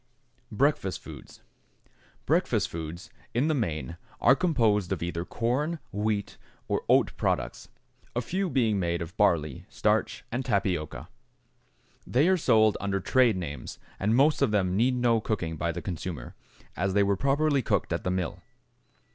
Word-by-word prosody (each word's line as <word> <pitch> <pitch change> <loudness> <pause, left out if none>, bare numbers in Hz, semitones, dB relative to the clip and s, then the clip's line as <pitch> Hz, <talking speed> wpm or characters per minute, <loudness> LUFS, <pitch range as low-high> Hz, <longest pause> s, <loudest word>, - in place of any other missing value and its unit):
=Breakfast 110 -5 +1
Foods.= - - -12 0.8
Breakfast - - +1
foods 85 +3 -7 0.2
in 135 +6 +2
the - - +3
main 85 - -2 0.2
are 135 - +6
composed 115 - +1
of 90 -4 -1
either 85 0 -3
corn, 130 - -1
wheat, 105 0 -2 0.3
or - - 0
oat - - +4
products, - - -2 0.5
a 120 - +1
few 185 +9 -2
being 115 -7 +2
made 85 -1 -1
of 85 +2 -10
barley, 80 -9 +1
starch, - - 0
and 125 +2 -2
tapioca. 95 - -1 1.0
They 140 +7 +3
are 190 - +5
sold 110 - +4
under 100 -1 -1
trade 120 +1 +3
names, 75 -7 -6 0.2
and 105 +4 +2
most 145 +4 +4
of - - +4
them 95 -3 +1
need 125 +5 +3
no 120 -2 +3
cooking 90 -8 -2
by 85 +2 -1
the 85 0 -6
consumer, 85 -6 -5 0.4
as 95 +2 -1
they 100 - +5
were 100 0 +2
properly 140 +5 +2
cooked - - 0
at - - -2
the - - -1
mill. 90 -2 -2
105 Hz, 155 wpm, -28 LUFS, 85-125 Hz, 1.0 s, are